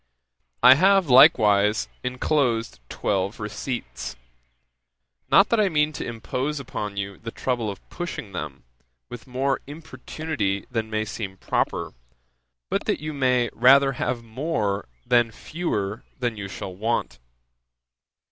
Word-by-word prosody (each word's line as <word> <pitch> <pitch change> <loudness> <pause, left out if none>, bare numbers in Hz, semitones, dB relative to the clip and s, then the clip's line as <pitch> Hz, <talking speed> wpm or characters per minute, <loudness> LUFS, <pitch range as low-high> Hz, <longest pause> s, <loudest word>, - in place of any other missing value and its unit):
'I 125 - +10
have, 190 +2 +4
likewise, 105 -4 +6 0.2
enclosed 125 - 0
twelve 100 +2 -1
receipts; 105 - -5 1.1
not 195 - +6
that 230 - +2
I 205 -2 +3
mean 150 -2 +1
to - - -5
impose 125 +6 -3
upon 105 -6 -5
you 100 0 -4
the 115 - -7
trouble 120 -2 -2
of 100 - -9
pushing 170 - -5
them, 75 -8 -6 0.5
with 120 +1 -9
more 135 +2 -1
importunity 150 -8 -4
than 110 -2 -2
may 110 0 -1
seem 100 -3 -6
proper, - - -1 0.7
but - - -2
that - - 0
you 155 0 -5
may 125 -4 +1
rather 135 +3 +6
have 120 -1 -2
more 110 - -2 0.2
than 120 -1 +3
fewer 115 - -3
than 120 -3 -2
you 100 -1 -6
shall 95 -1 -7
want. 115 +5 -2
120 Hz, 130 wpm, -24 LUFS, 105-140 Hz, 1.1 s, I